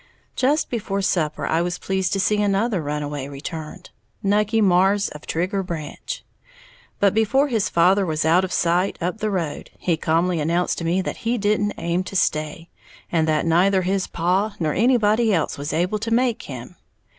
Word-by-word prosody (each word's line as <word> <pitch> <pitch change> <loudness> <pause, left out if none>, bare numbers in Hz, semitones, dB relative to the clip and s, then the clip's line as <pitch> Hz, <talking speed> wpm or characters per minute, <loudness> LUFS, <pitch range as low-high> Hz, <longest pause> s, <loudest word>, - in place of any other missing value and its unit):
Just 285 +4 +1
before 205 -4 -2
supper 155 -5 0
I 160 +1 +1
was 175 0 -2
pleased 190 -1 -1
to 195 - 0
see 210 +2 +2
another 205 -1 +1
runaway 145 -2 -4
returned, 150 +2 -8 0.3
Nucky 210 +2 +2
Marrs, 195 0 +3
of 150 - -11
Trigger 185 +4 -1
Branch. 170 - -6 0.7
But 200 -2 +3
before 255 +7 +2
his 225 -5 0
father 185 +4 +4
was 155 -4 -1
out 170 +4 +4
of 185 - -3
sight 175 +3 +1
up 180 +5 -3
the 215 - -1
road, 170 -7 -3
he 170 -3 0
calmly 165 +2 +1
announced 170 +4 0
to 165 - -4
me 180 +3 +1
that - - -4
he 235 +2 -1
didn't 205 0 0
aim 170 +2 -1
to 195 - -8
stay, 160 0 0 0.4
and 160 -2 +2
that 155 0 +1
neither 185 +3 +3
his 190 +1 0
paw 190 +5 0
nor 155 -3 0
anybody 225 -1 +3
else 165 -6 0
was 145 +2 -3
able 180 +6 0
to 225 +2 -3
make 235 0 +1
him. 125 -3 -9
185 Hz, 180 wpm, -22 LUFS, 165-205 Hz, 0.7 s, father